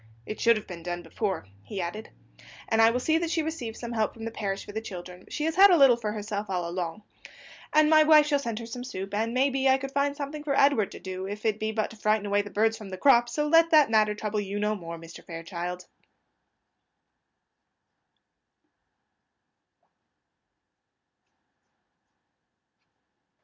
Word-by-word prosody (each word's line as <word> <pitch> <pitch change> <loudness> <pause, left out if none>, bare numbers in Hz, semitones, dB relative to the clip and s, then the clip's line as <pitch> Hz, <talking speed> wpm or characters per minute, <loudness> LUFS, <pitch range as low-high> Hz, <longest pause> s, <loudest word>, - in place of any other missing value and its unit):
"It 215 - -6
should 230 -1 +4
have 215 - -7
been 175 -2 -9
done 175 +1 -5
before," 190 - -3 0.2
he 190 - -7
added. 180 +5 -5 0.6
"And 225 0 +2
I 225 - +7
will 245 +2 0
see 315 +5 +1
that 335 -1 -2
she 325 -1 0
receives 295 -8 -5
some 235 -1 -6
help 220 -2 -1
from 225 -1 -8
the 225 - -4
parish 200 -3 -4
for - - -9
the 220 +2 -4
children; 180 -3 -9
she 300 - -4
has 320 +2 -1
had 400 +1 +9
a 355 - +5
little 270 -4 +7
for 220 -3 -4
herself 210 -1 -5
all 180 -2 -2
along. 175 +2 -4 0.7
And 305 0 +5
my 310 0 +6
wife 305 -1 +6
shall 290 -1 +1
send 230 -5 -4
her 230 - -6
some 245 +2 -7
soup, 195 -6 -6
and, 220 +2 -1
may 265 +3 +2
be, 265 0 +1
I 265 - +5
could 270 0 -6
find 280 0 0
something 295 +1 -5
for 280 -2 0
Edward 275 -8 +3
to - - -9
do, 185 0 -6
if 205 +2 -7
it 215 -1 +1
be 215 0 -2
but 215 -1 -2
to 225 - -13
frighten 215 0 +1
away 205 0 +1
the 205 - -9
birds 220 +2 +1
from 210 -3 -9
the 185 - -6
crops; 240 +1 +4
so 300 +2 0
let 330 +2 +5
that 305 -7 +5
matter 215 -1 +3
trouble 210 0 -3
you 200 0 -4
no 210 +1 0
more, 170 -4 -7
Mr. 165 0 -12
Fairchild." 175 +1 -6
220 Hz, 185 wpm, -27 LUFS, 195-275 Hz, 0.7 s, had